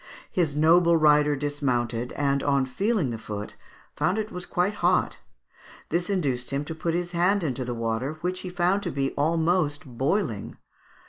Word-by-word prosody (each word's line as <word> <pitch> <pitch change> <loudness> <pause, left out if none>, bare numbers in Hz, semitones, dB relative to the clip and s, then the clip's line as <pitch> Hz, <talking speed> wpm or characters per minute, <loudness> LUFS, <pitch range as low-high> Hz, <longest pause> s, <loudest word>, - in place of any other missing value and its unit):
His 160 -6 0
noble 165 +2 +5
rider 150 -1 +4
dismounted, 125 -5 -1
and 140 -1 0
on 140 -2 +2
feeling 185 - 0
the 115 - -5
foot 105 -1 -6 0.4
found 185 - +1
it 215 0 -3
was 180 0 -6
quite 180 +4 0
hot. 180 +1 +2 0.7
This 175 +4 -1
induced 135 -11 -1
him 140 +1 -2
to 160 - -5
put 165 +1 -2
his 175 0 -2
hand 180 +3 +2
into 130 -4 -2
the 120 -1 -4
water, 115 +5 -2
which 180 +1 -2
he 185 - -6
found 180 +2 +1
to - - -3
be 135 0 -1
almost 160 0 +1
boiling. 130 - -2
150 Hz, 170 wpm, -26 LUFS, 135-180 Hz, 0.7 s, noble